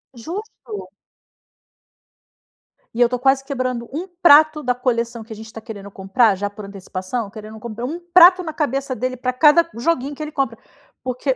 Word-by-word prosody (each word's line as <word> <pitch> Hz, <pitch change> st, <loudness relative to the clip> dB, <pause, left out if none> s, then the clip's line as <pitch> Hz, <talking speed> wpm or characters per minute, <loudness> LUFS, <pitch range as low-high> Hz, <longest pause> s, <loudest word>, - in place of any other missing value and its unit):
Justo. 240 Hz, -, -8 dB, 2.0 s
E 235 Hz, -, -2 dB
eu 240 Hz, -, +5 dB
tô 250 Hz, -, -1 dB
quase 270 Hz, +2 st, +2 dB
quebrando 255 Hz, -4 st, -3 dB
um 330 Hz, +7 st, -4 dB
prato 310 Hz, -2 st, +6 dB
da 250 Hz, -3 st, 0 dB
coleção 235 Hz, -2 st, -2 dB
que 220 Hz, +1 st, -10 dB
a -, -, -9 dB
gente 220 Hz, +1 st, -11 dB
tá 225 Hz, -, -8 dB
querendo 210 Hz, -3 st, -9 dB
comprar 195 Hz, +3 st, +2 dB
já 205 Hz, +2 st, -2 dB
por 205 Hz, 0 st, -9 dB
antecipação, 195 Hz, +3 st, -5 dB
querendo 215 Hz, +1 st, -10 dB
comprar 235 Hz, +1 st, -6 dB
um 320 Hz, +7 st, -4 dB
prato 365 Hz, +1 st, +8 dB
na 320 Hz, -2 st, -5 dB
cabeça 275 Hz, -2 st, -2 dB
dele 255 Hz, +1 st, -3 dB
pra 255 Hz, +1 st, -2 dB
cada 305 Hz, +5 st, +5 dB
joguinho 275 Hz, +2 st, -1 dB
que 310 Hz, -, -10 dB
ele 305 Hz, 0 st, -5 dB
compra, 270 Hz, -6 st, -2 dB, 0.4 s
porque 255 Hz, +1 st, -1 dB
250 Hz, 175 wpm, -20 LUFS, 220-285 Hz, 2.0 s, prato